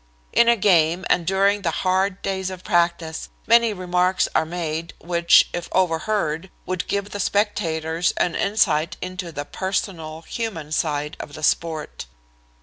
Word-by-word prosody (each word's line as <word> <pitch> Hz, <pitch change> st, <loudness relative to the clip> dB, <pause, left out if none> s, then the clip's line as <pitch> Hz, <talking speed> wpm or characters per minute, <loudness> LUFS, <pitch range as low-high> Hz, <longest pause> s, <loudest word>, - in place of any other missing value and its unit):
In 235 Hz, -, +5 dB
a 235 Hz, -, +6 dB
game, 175 Hz, -2 st, +3 dB
and 170 Hz, -2 st, +2 dB
during 200 Hz, +2 st, +2 dB
the 175 Hz, -, 0 dB, 0.2 s
hard 190 Hz, +1 st, +1 dB
days 190 Hz, -1 st, -2 dB
of 185 Hz, -1 st, -8 dB
practice, 170 Hz, -3 st, 0 dB, 0.2 s
many 235 Hz, 0 st, +5 dB
remarks 180 Hz, -1 st, +1 dB
are 160 Hz, -, +2 dB
made 165 Hz, -1 st, -4 dB
which, 170 Hz, 0 st, +4 dB
if 175 Hz, -, -4 dB
overheard, 180 Hz, -1 st, 0 dB, 0.2 s
would 185 Hz, -1 st, -3 dB
give 200 Hz, 0 st, -2 dB
the 205 Hz, -, -5 dB
spectators 165 Hz, -5 st, 0 dB
an 175 Hz, -, +1 dB
insight 170 Hz, -6 st, +1 dB
into 185 Hz, -1 st, -5 dB
the 145 Hz, -2 st, -5 dB
personal, 165 Hz, -3 st, -4 dB
human 180 Hz, -11 st, -5 dB
side 150 Hz, -1 st, -1 dB
of 145 Hz, -, -8 dB
the 155 Hz, -, -9 dB
sport. 160 Hz, -, -1 dB
175 Hz, 145 wpm, -22 LUFS, 160-195 Hz, 0.2 s, a